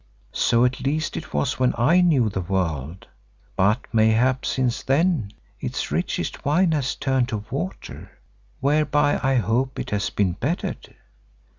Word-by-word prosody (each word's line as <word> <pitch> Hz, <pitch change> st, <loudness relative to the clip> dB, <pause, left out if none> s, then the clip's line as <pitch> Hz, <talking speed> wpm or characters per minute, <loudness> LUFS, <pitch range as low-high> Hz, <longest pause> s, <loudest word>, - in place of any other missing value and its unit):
So 120 Hz, +1 st, +3 dB
at 125 Hz, +1 st, -1 dB
least 155 Hz, +4 st, -1 dB
it 155 Hz, -, -6 dB
was 130 Hz, -, -1 dB
when 125 Hz, -1 st, +2 dB
I 155 Hz, +10 st, +4 dB
knew 150 Hz, -10 st, +3 dB
the 95 Hz, -2 st, -2 dB
world, 85 Hz, -3 st, -3 dB, 0.5 s
but 105 Hz, +6 st, +2 dB
mayhap 115 Hz, +4 st, +3 dB
since 130 Hz, -2 st, 0 dB
then 140 Hz, -, +1 dB, 0.3 s
its -, -, -4 dB
richest -, -, -2 dB
wine 165 Hz, +5 st, +2 dB
has 145 Hz, -4 st, -1 dB
turned 130 Hz, -2 st, 0 dB
to 110 Hz, -3 st, -3 dB
water, 95 Hz, +1 st, -5 dB, 0.5 s
whereby 145 Hz, +1 st, +2 dB
I 135 Hz, 0 st, +2 dB
hope 125 Hz, +3 st, 0 dB
it -, -, -5 dB
has 100 Hz, -1 st, 0 dB
been 100 Hz, -3 st, 0 dB
bettered. -, -, -4 dB
125 Hz, 145 wpm, -23 LUFS, 105-140 Hz, 0.5 s, I